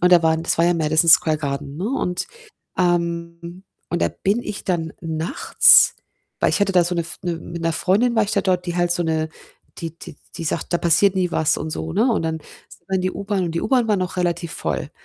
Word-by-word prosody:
und 180 0 +3
da 170 -1 +6
waren 160 0 +1
das - - +1
war 165 - +4
ja 175 - +3
Madison 160 +1 +3
Square 155 0 +6
Garden, 140 0 -5
ne? 190 +6 -3
Und, 180 -9 -2 0.5
ähm 170 0 -2 0.3
und 175 - -2
da - - +2
bin 205 +5 -1
ich 210 - -6
dann 165 -4 -2
nachts, 160 0 +4 0.5
weil - - +2
ich - - 0
hatte 200 -1 +1
da 180 -2 +4
so 175 +1 -1
'ne 170 - -1
F 165 - -8
'ne 175 -2 -2
mit 170 0 -8
'ner 165 0 0
Freundin 210 +9 +1
war 220 - +4
ich 210 - -4
da - - +2
dort, 180 -2 0
die 175 0 -3
halt 175 0 +2
so 175 - -1
'ne 160 -1 -1 0.5
die 165 -1 -7
die - - -11 0.2
die 165 - -6
sagt: 160 +2 -3
„Da 175 - +2
passiert 175 +4 +3
nie 180 -2 0
was“ 160 -1 +2
und 155 - -5
so, 160 +1 -4
ne, 225 +7 +2
und 210 - -1
dann 160 0 -2 0.3
sind - - -18
wir 190 - -2
in - - -1
die 185 - 0
U-Bahn, 200 -2 -2
und 165 - -4
die 170 - -1
U-Bahn 250 -4 +1
war 210 - +2
noch 185 0 -4
relativ 175 -2 -2
voll. - - -3
175 Hz, 245 wpm, -21 LUFS, 165-185 Hz, 0.5 s, da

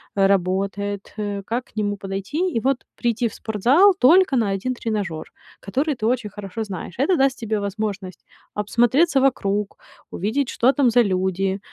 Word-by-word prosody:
работает, 195 +1 0
э, 205 -1 -3
как 240 +4 -3
к - - -28
нему 205 -1 -1
подойти, 195 - -3
и 230 - 0
вот 270 +3 +1 0.2
прийти 240 0 0
в 220 - -8
спортзал 260 - +3
только 335 +2 +5
на 225 -5 +1
1 225 +7 -2
тренажёр, 205 -9 -3 0.3
который 275 +9 -1
ты 225 -3 -4
очень 240 -2 0
хорошо 205 +2 -6
знаешь. 185 -4 -7
Это 335 +7 +2
даст 270 -1 +2
тебе 220 -2 -2
возможность 200 -2 -4 0.3
обсмотреться 240 +9 +2
вокруг, 210 -6 0 0.3
увидеть, 240 +8 -1
что 250 +3 +3
там 270 -4 +3
за 245 +1 +5
люди, 190 -1 0
215 Hz, 160 wpm, -22 LUFS, 195-255 Hz, 0.3 s, только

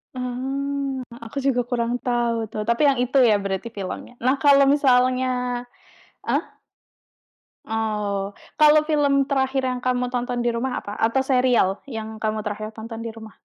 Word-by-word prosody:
Oh, 270 +1 -3
a 230 -1 -10
aku 280 - -9
juga 265 -2 +1
kurang 240 0 -1
tahu 235 -3 0
tuh, 215 -1 -4
tapi 235 +4 +1
yang 270 - +1
itu 250 +2 +1
ya 210 - +4
berarti 195 +4 -3
filmnya. 190 +5 -6
Nah 260 +2 +4
kalau 280 -1 +6
misalnya 255 -2 +3 1.0
ah? - - 0 1.2
Oh, 210 -3 -2 0.2
kalau 305 0 +6
film 280 -3 +2
terakhir 265 -1 0
yang 250 -1 -2
kamu 250 0 0
tonton 245 0 -1
di 240 0 +1
rumah, 255 +2 -2
apa? 205 +1 -7
Atau 230 +4 +1
serial 250 -7 +2
yang 220 -2 -6
kamu 215 0 -1
terakhir 215 +1 -4
tonton 225 +1 -8
di 230 - -4
rumah? 220 -1 -12
245 Hz, 155 wpm, -23 LUFS, 220-265 Hz, 1.2 s, kalau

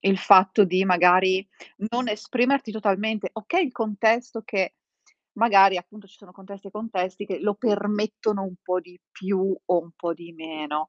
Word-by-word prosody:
il 195 0 +2
fatto 190 +2 +6
di 185 +1 +1
magari 185 +1 +4 0.4
non 245 0 -2
esprimerti 240 +4 0
totalmente 215 0 -1
okay 280 - 0
il 260 - -5
contesto 225 +1 0
che 195 -4 -2 0.3
t - - -31 0.3
magari, 195 -4 +6
appunto, 195 +3 -10
ci 205 - -23
sono 195 -3 -19
contesti 195 +1 -13
e - - -16
contesti 200 -3 -4
che 185 - -4
lo 205 -1 0
permettono 210 -1 -1
un 190 -2 -7
po' 180 0 -1
di 180 +1 -19
più 190 0 -1
o 180 -1 +2
un 170 0 -17
po' 170 0 -4
di 170 +1 -14
meno, 155 -1 -5
195 Hz, 170 wpm, -24 LUFS, 185-215 Hz, 0.4 s, fatto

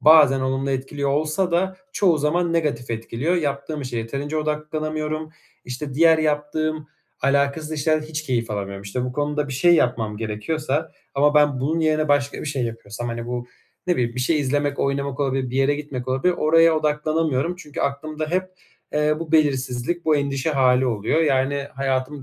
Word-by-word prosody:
bazen 150 -4 +7
olumlu 135 +1 -1
etkiliyor 140 +1 -2
olsa 155 +6 0
da 185 +2 +1 0.2
çoğu 175 -6 +3
zaman 170 +4 +1
negatif 140 -8 -1
etkiliyor. 115 +9 -1
Yaptığım 145 -1 -2
işe 125 -3 -5
yeterince 140 +7 -3
odaklanamıyorum. 155 0 -2 0.3
İşte, 130 +2 -5
diğer 160 +2 +5
yaptığım 155 0 -1 0.3
alakasız 140 +3 +1
işlerde 155 0 +1
hiç 155 -1 -4
keyif 120 -6 -1
alamıyorum. 100 -1 -4
İşte, 110 +6 -3
bu 125 - -3
konuda 145 +1 -1
bir 135 - -4
şey 170 +7 +5
yapmam 115 -7 +1
gerekiyorsa 140 +8 -2 0.2
ama 145 +2 +3
ben 145 -3 +4
bunun 160 +5 0
yerine 155 -1 +1
başka 145 -1 +1
bir - - -6
şey 135 -4 -1
yapıyorsam, 115 0 -5
hani, 115 0 -4
bu 120 0 -4 0.4
ne 180 - +3
bileyim, 120 -1 0
bir 125 - -2
şey 150 +4 +2
izlemek, 145 +1 0
oynamak 140 0 -1
olabilir, 135 -2 0
bir 130 - -3
yere 135 +2 +3
gitmek 140 -4 -6
olabilir, 135 +8 +2
oraya 165 +1 +5
odaklanamıyorum. 155 +1 0
Çünkü 150 -5 -7
aklımda 155 +2 -2
hep, 185 +1 +2 0.5
eee, 150 0 +2
bu 165 -1 -6
belirsizlik, 140 +1 +1
bu 155 -1 +4
endişe 140 +1 -1
hâli 130 -2 +3
oluyor. 115 +6 +1
Yani, 140 -2 +1
hayatımı 135 +1 -2
145 Hz, 170 wpm, -23 LUFS, 130-155 Hz, 0.5 s, bazen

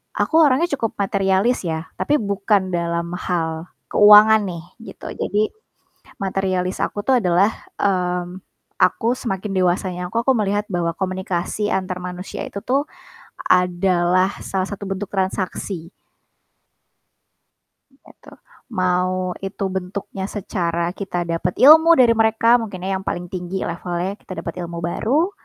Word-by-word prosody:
aku 320 - 0
orangnya 300 +3 +4
cukup 225 -4 -2
materialis 195 +4 +1
ya, 160 0 -4
tapi 295 - +2
bukan 200 -1 0
dalam 170 0 -2
hal 165 -2 -2 0.2
keuangan 210 +1 +8
nih 170 -3 -6 0.3
gitu. - - -11
Jadi 210 +1 -1 0.7
materialis 190 -1 -1
aku - - -3
tuh 260 -2 +4
adalah, 180 +4 +3 0.3
mmm, 180 -2 -1 0.4
aku 235 +1 +2
semakin 200 -5 -4
dewasanya 180 0 0
aku 230 - 0
aku 265 +3 +2
melihat 205 -1 0
bahwa 175 -3 -1
komunikasi 190 +2 -2
antar 185 -1 -2
manusia 180 +1 -6
itu 200 - -6
tuh 270 +7 0 0.6
adalah 180 +1 +2
salah 190 -1 -2
satu 200 -1 -6
bentuk 195 +1 -4
transaksi. 190 -2 -3 2.0
Gitu. 270 - -19 0.5
Mau 185 0 0
itu 195 +1 -5
bentuknya 190 +1 -5
secara 170 -4 -2
kita 180 -2 -4
dapat 170 +1 -2
ilmu 320 +4 +8
dari 250 -4 +5
mereka, 225 +1 +4
mungkin 200 -5 -6
ya 190 0 -1
yang 190 - -12
paling 175 0 -4
tinggi 185 +1 -4
levelnya 175 +3 -4
kita 185 - -8
dapat 165 - -6
ilmu 170 -1 -5
baru, 275 - 0
190 Hz, 130 wpm, -21 LUFS, 180-210 Hz, 2.0 s, keuangan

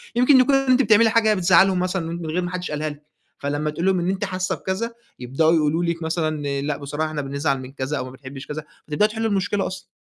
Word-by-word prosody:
يمكن 255 +3 +6
يكون 275 +2 +4
أنتِ 270 -1 +3
بتعملي 225 -2 +5
حاجة 220 -1 +3
بتزعلهم 190 0 +4
مثلًا، 180 -2 -1
من 170 0 -5
غير 160 +3 -1
ما 175 0 -4
حدش 180 -2 -4
قالها 150 +1 -2
لِك، 145 0 -11 0.4
فلما 145 +2 -2
تقولي 170 +5 0
لهم 185 - 0
إن 175 - -1
أنتِ 195 +2 -1
حاسة 185 -1 -2
بكذا، 195 +5 -3 0.3
يبدأوا 135 +6 +1
يقولوا 160 +1 +2
لِك 170 -1 -2
مثلًا، 155 -4 -2
لأ 145 0 -2
بصراحة 145 +2 -3
إحنا 155 -1 -3
بنزعل 140 0 -1
من 130 - -9
كذا، 135 +2 -3
أو 130 - -3
ما 130 - -9
بنحبش 135 +1 -10
كذا، 155 +1 -5 0.2
فتبدأوا 185 +8 +2
تحلوا 225 +1 -2
المشكلة 195 0 0
أصلًا. 185 0 -8
170 Hz, 230 wpm, -22 LUFS, 145-190 Hz, 0.4 s, يمكن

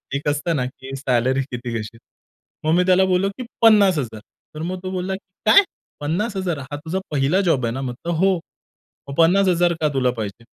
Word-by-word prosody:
एक 145 +1 -3
असतं 150 +3 -1
ना, 125 -3 0
की 130 +1 -8
सॅलरी 130 0 +1
किती 120 -1 -5
घेशील? 115 +1 -5 0.7
मग 155 - +3
मी 180 - +4
त्याला 185 +1 +4
बोललो, 185 +1 +1
की 255 - -5 0.2
"50,000" 190 - +4 0.4
तर 155 - -6
मग 180 +2 -3
तो 185 - -4
बोलला, 185 +1 -2 0.3
"काय? 220 - +8 0.4
50,000? 180 +1 -2
हा 135 +2 -7
तुझा 185 +4 -2
पहिला 145 +7 +2
जॉब 145 -10 +1
आहे 115 - -1
ना?" 135 - -4
म्हटलं, 130 +7 -4
"हो." 190 +4 +3 0.7
"मग - - -5
50,000 175 0 +4
का 150 - +3
तुला 125 -2 +2
पाहिजे?" 105 +2 -5
160 Hz, 180 wpm, -21 LUFS, 130-185 Hz, 0.7 s, काय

